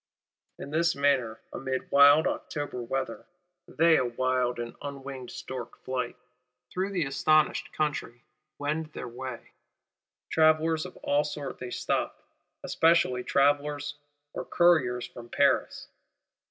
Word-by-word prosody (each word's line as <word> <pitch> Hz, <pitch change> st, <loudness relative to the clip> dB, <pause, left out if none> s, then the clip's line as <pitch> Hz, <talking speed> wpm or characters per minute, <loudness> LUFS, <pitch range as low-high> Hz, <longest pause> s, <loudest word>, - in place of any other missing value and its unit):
In 140 Hz, -, -8 dB
this 165 Hz, +2 st, +2 dB
manner, 135 Hz, -6 st, +1 dB
amid 130 Hz, 0 st, -4 dB
wild 145 Hz, +2 st, +7 dB
October 145 Hz, -4 st, -3 dB
weather, 130 Hz, +2 st, -4 dB, 0.4 s
they 165 Hz, 0 st, +4 dB
a -, -, +1 dB
wild 125 Hz, 0 st, 0 dB, 0.2 s
unwinged 135 Hz, -3 st, -7 dB
stork 125 Hz, -3 st, -7 dB
flight, 125 Hz, -2 st, -2 dB, 0.6 s
through 190 Hz, +2 st, -1 dB
the 180 Hz, -6 st, -1 dB
astonished 155 Hz, +3 st, +2 dB
country, 140 Hz, -6 st, -3 dB, 0.3 s
wend 150 Hz, +2 st, -2 dB
their -, -, -6 dB
way. 125 Hz, 0 st, -8 dB, 0.8 s
Travellers 155 Hz, +1 st, +3 dB
of 180 Hz, -, -14 dB
all 145 Hz, +1 st, +2 dB
sorts 145 Hz, -2 st, -6 dB
they 125 Hz, -, -6 dB
stop; -, -, -2 dB, 0.4 s
especially 160 Hz, -7 st, +3 dB
travellers 145 Hz, +2 st, +1 dB, 0.4 s
or -, -, -4 dB
couriers 140 Hz, -9 st, +3 dB
from 120 Hz, -1 st, -11 dB
Paris. -, -, +1 dB
140 Hz, 115 wpm, -28 LUFS, 125-155 Hz, 0.8 s, wild